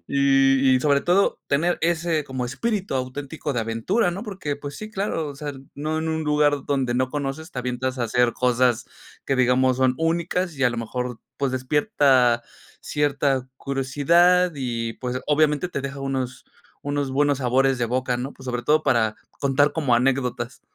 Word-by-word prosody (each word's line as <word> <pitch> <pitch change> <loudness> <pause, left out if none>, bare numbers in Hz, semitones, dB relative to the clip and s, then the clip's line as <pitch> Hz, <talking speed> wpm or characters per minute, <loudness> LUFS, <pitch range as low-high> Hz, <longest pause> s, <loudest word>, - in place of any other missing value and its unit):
Y 135 -1 +4
y, 125 - 0
sobre 140 -1 +3
todo, 180 +5 +2
tener 170 +5 +1
ese 165 -2 0
como 130 -2 -4
espíritu 195 - -2
auténtico 140 +3 -4
de 120 - -1
aventura, 115 - 0
¿no? 190 +4 -5
Porque, 185 -10 -4
pues 145 0 -8
sí, 215 0 -8
claro, 195 -6 -2
o 140 - -7
sea, 145 0 -5 0.2
no 155 +2 -2
en 160 0 -2
un 160 0 -2
lugar 150 -2 +2
donde 130 -4 0
no 130 +1 +1
conoces, 145 +3 -4
te 125 - -5
avientas 125 +1 -3
a 120 - 0
hacer 120 +1 +2
cosas 125 -1 +2 0.4
que, 135 - 0
digamos, 130 0 +3
son 130 -1 +3
únicas, 170 +1 -1
y 135 - +1
a 125 - +4
lo 120 - -5
mejor, 120 +1 -4 0.2
pues, 135 -2 -1
despierta 130 - +2 0.4
cierta 140 -3 0
curiosidad 165 +8 +3
y, 115 -4 -3
pues, 125 0 -4
obviamente, 150 +2 +2
te 140 - -4
deja 140 0 -6
unos 135 -2 -3 0.4
unos 145 -1 -2
buenos 145 0 +2
sabores 130 0 +2
de 120 - 0
boca, 125 0 -1
¿no? 130 +3 -5
Pues, 130 - -14
sobre 120 -1 -3
todo, 155 +4 +3
para 110 -3 +1 0.2
contar 145 +1 +2
como 140 -7 +1
anécdotas. 125 -1 0
135 Hz, 175 wpm, -23 LUFS, 125-150 Hz, 0.4 s, Y